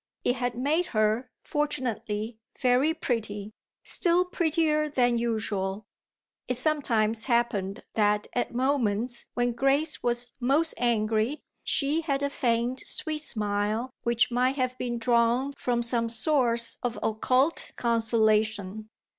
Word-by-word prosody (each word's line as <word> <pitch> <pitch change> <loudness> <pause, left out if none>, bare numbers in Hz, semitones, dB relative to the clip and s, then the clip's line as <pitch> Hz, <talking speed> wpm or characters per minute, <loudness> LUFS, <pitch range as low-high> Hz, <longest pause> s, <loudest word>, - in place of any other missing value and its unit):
It 245 - +1
had 245 -1 -1
made 300 +8 +1
her, 215 +4 +1
fortunately, 230 -6 -2 0.2
very 255 +4 +3
pretty 215 -8 -3 0.3
still 355 0 +2
prettier 315 -3 +1
than 245 -4 +2
usual: 210 -3 -2 0.6
it 250 - -1
sometimes 230 -7 +1
happened 235 -6 0
that 210 -1 +2
at 245 - -1
moments 240 -3 0
when 245 0 +1
Grace 275 +6 +1
was 240 0 -1
most 280 +6 +2
angry 225 +3 0 0.2
she 295 +3 +2
had 285 -3 -1
a 280 - 0
faint 240 -1 0
sweet 310 -3 -2
smile 215 -1 -1
which 235 0 +1
might 250 +2 +2
have 255 -2 -1
been 240 -1 -2
drawn 235 +3 +2
from 245 -3 -1
some 235 -1 0
source 235 -2 +2
of 245 -2 -2
occult 255 +8 +1
consolation. 220 -3 +1
240 Hz, 120 wpm, -27 LUFS, 220-275 Hz, 0.6 s, very